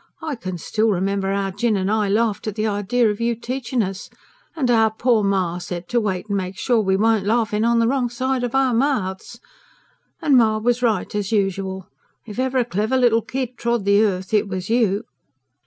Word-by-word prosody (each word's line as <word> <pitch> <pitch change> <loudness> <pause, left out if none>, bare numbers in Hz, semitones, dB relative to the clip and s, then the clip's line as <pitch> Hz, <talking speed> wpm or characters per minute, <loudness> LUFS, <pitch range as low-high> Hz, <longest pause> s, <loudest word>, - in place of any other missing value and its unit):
I 315 -2 -2
can 185 -7 -5
still 220 +6 0
remember 195 0 0
'ow 195 -1 -1
Jinn 210 +2 0
and 190 +1 -1
I 215 -2 +1
laughed 215 +1 0
at 210 - -3
the 215 0 -1
idea 215 +2 +1
of 210 - -6
you 235 0 +1
teaching 245 0 -2
us; 195 0 -6 0.5
and 260 -6 +1
'ow 225 -2 +4
poor 220 0 +1
ma 185 -3 0
said 175 0 -6
to 240 -1 +1
wait 195 -1 -2
and 200 -1 -1
make 185 0 -4
sure 240 +1 +1
we 190 -2 +1
weren't 220 -1 +2
laughing 220 -1 +1
on 235 0 +3
the 230 0 +3
wrong 255 -1 0
side 255 +1 -1
of 245 +1 -2
our 265 -2 +3
mouths. 225 -7 -1 0.8
And 285 - +3
ma 220 -2 +4
was 240 +3 0
right 220 -6 0
as 205 -1 -2
usual. 195 -2 -1 0.4
For 220 - -9
if 210 - -7
ever 260 0 0
a 245 - +2
clever 220 +4 0
little 235 -3 +3
kid 255 0 -4
trod 235 -3 0
the 200 +1 +4
earth, 190 -1 -2
it 210 0 +3
was 185 +1 -4
you." 220 -3 +2
220 Hz, 210 wpm, -21 LUFS, 195-240 Hz, 0.8 s, ow